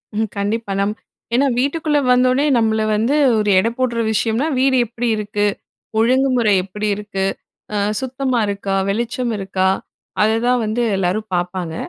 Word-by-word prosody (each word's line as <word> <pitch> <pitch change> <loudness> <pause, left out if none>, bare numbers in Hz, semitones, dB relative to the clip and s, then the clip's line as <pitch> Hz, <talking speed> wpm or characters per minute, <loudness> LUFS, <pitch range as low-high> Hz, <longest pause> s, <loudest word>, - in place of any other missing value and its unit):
ம் 220 +1 0
கண்டிப்பா. 205 +1 -2
நம் 200 +1 0 0.4
ஏன்னா 275 +2 +3
வீட்டுக்குள்ள 295 +3 0
வந்த 250 0 +4
ஒடனே 275 +3 +2
நம்மள 220 -1 +1
வந்து 230 +7 +1 0.2
ஒரு 210 -1 +1
எடை 225 - +1
போட்ற 245 -2 0
விஷயம்னா, 225 +5 0
வீடு 265 0 +3
எப்டி 240 +2 -4
இருக்கு? 210 -1 -1 0.5
ஒழுங்குமுறை 250 -2 +3
எப்டி 210 +3 -4
இருக்கு? 200 -2 -3 0.5
ஆ - - 0 0.2
சுத்தமா 260 -1 -1
இருக்கா? 200 -1 -3
வெளிச்சம் 235 +3 -1
இருக்கா? 190 -1 0 0.5
அததான் 235 +3 +2
வந்து 220 +3 -1
எல்லாரும் 195 +4 -1
பாப்பாங்க. 175 -2 -2
220 Hz, 140 wpm, -19 LUFS, 205-250 Hz, 0.5 s, வந்த